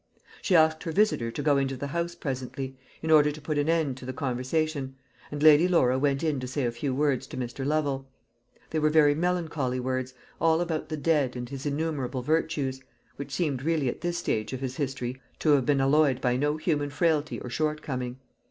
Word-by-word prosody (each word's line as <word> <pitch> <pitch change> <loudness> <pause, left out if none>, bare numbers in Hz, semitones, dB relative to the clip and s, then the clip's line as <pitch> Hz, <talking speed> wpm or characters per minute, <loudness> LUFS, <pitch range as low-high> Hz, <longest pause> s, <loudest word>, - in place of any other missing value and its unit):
She 185 - +2
asked 160 -1 +4
her 165 - -4
visitor 190 - +2
to 145 +5 -5
go 145 -2 +4
into 135 -1 -1
the 140 - -4
house 170 0 -2
presently, 130 0 -4 0.3
in 160 - 0
order 150 -1 +6
to 150 - -9
put 150 0 -2
an 145 +2 0
end 160 -6 +1
to 130 - -10
the 130 - -3
conversation; 135 +1 -2 0.3
and 145 0 -4
Lady 155 +2 +7
Laura 130 -8 +3
went 140 0 +1
in 155 -4 0
to 130 - -5
say 130 +1 -2
a 120 - 0
few 125 +4 -3
words 140 -2 +1
to - - -8
Mr. 125 +1 -4
Lovel. 140 -2 0 0.6
They 160 - 0
were 155 0 +3
very 150 -2 +5
melancholy 160 -6 -1
words 130 0 -2 0.2
all 165 0 +3
about 165 -3 -2
the 155 - -3
dead, 145 -5 +1
and 120 0 -5
his 140 +1 -5
innumerable 145 -4 -2
virtues 145 -3 0 0.4
which 140 - -6
seemed 145 -8 -1
really 155 -3 +1
at - - -6
this 175 0 -1
stage 110 -9 -2
of 130 - -3
his 130 -1 -4
history 130 -2 -3 0.2
to 155 - +2
have 135 -4 +3
been 145 -2 +3
alloyed 135 -1 +3
by 125 -2 +1
no 145 +3 0
human 150 -3 0
frailty 155 0 0
or 125 - -7
shortcoming. 135 -5 -2
145 Hz, 210 wpm, -27 LUFS, 130-155 Hz, 0.6 s, Lady